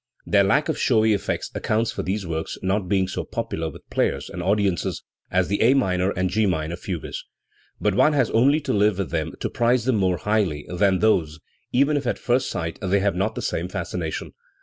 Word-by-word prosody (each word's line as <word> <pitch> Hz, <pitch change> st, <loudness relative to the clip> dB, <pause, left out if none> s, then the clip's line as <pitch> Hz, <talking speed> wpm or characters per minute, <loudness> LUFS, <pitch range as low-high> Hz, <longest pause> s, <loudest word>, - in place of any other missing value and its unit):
Their 100 Hz, -1 st, +4 dB
lack 125 Hz, +10 st, +2 dB
of 160 Hz, -, -2 dB
showy 110 Hz, -3 st, +3 dB
effects 100 Hz, -, -2 dB
accounts 110 Hz, +1 st, 0 dB
for -, -, -4 dB
these 95 Hz, +1 st, -2 dB
works 80 Hz, -1 st, -4 dB
not 95 Hz, 0 st, 0 dB
being 95 Hz, -2 st, +2 dB
so -, -, -3 dB
popular 80 Hz, 0 st, -3 dB
with -, -, -14 dB
players -, -, -1 dB
and 90 Hz, -, -5 dB
audiences 100 Hz, -2 st, 0 dB, 0.3 s
as 90 Hz, -1 st, +1 dB
the 100 Hz, -, -1 dB
A 120 Hz, +5 st, +5 dB
minor 95 Hz, -7 st, +1 dB
and 95 Hz, -1 st, 0 dB
G 110 Hz, +3 st, +1 dB
minor 80 Hz, -2 st, -1 dB
fugues. 90 Hz, -3 st, -5 dB, 0.6 s
But 105 Hz, -, +1 dB
one 150 Hz, +10 st, +4 dB
has 130 Hz, -6 st, +2 dB
only 140 Hz, +7 st, +4 dB
to -, -, -2 dB
live 105 Hz, -1 st, +3 dB
with 100 Hz, -3 st, -3 dB
them 80 Hz, -1 st, -2 dB
to -, -, -1 dB
prize 120 Hz, 0 st, +1 dB
them 130 Hz, -4 st, +2 dB
more 95 Hz, -3 st, +1 dB
highly 100 Hz, -9 st, 0 dB
than 95 Hz, +1 st, +2 dB
those, 80 Hz, -8 st, +2 dB, 0.3 s
even 140 Hz, +4 st, +3 dB
if 140 Hz, -3 st, -3 dB
at -, -, 0 dB
first 125 Hz, +1 st, 0 dB
sight 80 Hz, -1 st, -4 dB
they 100 Hz, 0 st, +2 dB
have 100 Hz, -1 st, +1 dB
not 95 Hz, +2 st, -1 dB
the -, -, -4 dB
same 85 Hz, -, -2 dB
fascination. 90 Hz, -3 st, -4 dB
100 Hz, 210 wpm, -23 LUFS, 90-110 Hz, 0.6 s, A